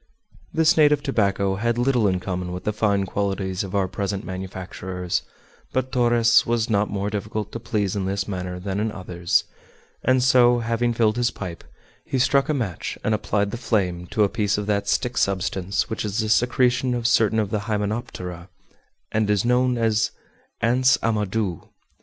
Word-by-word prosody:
This 160 +1 +3
native 150 -2 +4
tobacco 100 -7 +1
had 120 +3 0
little 120 -3 +2
in 95 -2 +1
common 90 -1 -4
with 90 +1 -6
the 105 - -1
fine 100 -2 +1
qualities 95 -1 -2
of 95 0 -6
our 95 -2 +2
present 100 +1 -3
manufacturers; 95 -1 -4 0.5
but 130 0 -1
Torres 120 -2 +4
was 115 -1 0
not 105 0 +2
more 100 0 -2
difficult 105 0 -4
to 115 - -5
please 105 -4 -1
in 100 -2 -1
this 95 0 -2
matter 90 -2 -4
than 95 +2 -3
in 110 +1 -1
others, 90 -3 0 0.6
and 130 -1 +3
so, 125 -1 +5
having 115 +1 0
filled 110 -1 +1
his 120 -1 +2
pipe, 90 -4 -7 0.4
he 135 - -2
struck 135 +3 +3
a - - +2
match 110 -10 -3
and 110 - +1
applied 100 -1 0
the 120 - -4
flame 90 -7 -1
to 105 - +1
a - - +4
piece 105 -1 0
of 105 - -2
that 100 -1 0
stick 125 +4 0
substance 95 0 0
which 110 - -3
is 105 -1 -3
the 110 - 0
secretion 125 +2 +2
of 120 -1 -3
certain 115 -2 +3
of 105 -3 0
the 105 - 0
hymenoptera, 105 -4 -3 0.6
and 110 -1 +1
is 105 +1 +2
known 125 0 +2
as 110 -1 +2 0.5
"ants' 125 +2 +4
amadou." 105 -4 -1
105 Hz, 175 wpm, -23 LUFS, 95-120 Hz, 0.6 s, so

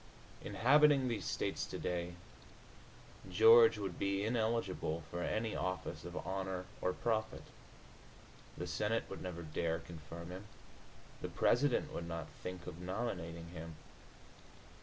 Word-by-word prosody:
Inhabiting 140 +1 +5
These 115 -3 -2
States - - -1
today, 85 0 -3 1.1
George 115 +4 +8
would 95 -4 -4
be 100 +1 +1
ineligible 110 -8 0
for 85 - -3
any 110 +4 -1
office 90 0 -3
of - - -6
honor 95 -1 -2 0.2
or 90 - +2
profit. 110 +2 -1 1.1
The - - -3
Senate 115 +2 0
would 95 - -6
never 85 -2 -5
dare 80 +1 -1
confirm 85 +1 -9
him; 95 +3 -8 0.7
the - - -3
President 130 +1 +2
would 85 - -4
not 85 -1 -4
think 90 -1 -6
of 80 - -7
nominating 90 -4 -3
him. 80 -1 -7
95 Hz, 120 wpm, -36 LUFS, 85-110 Hz, 1.1 s, George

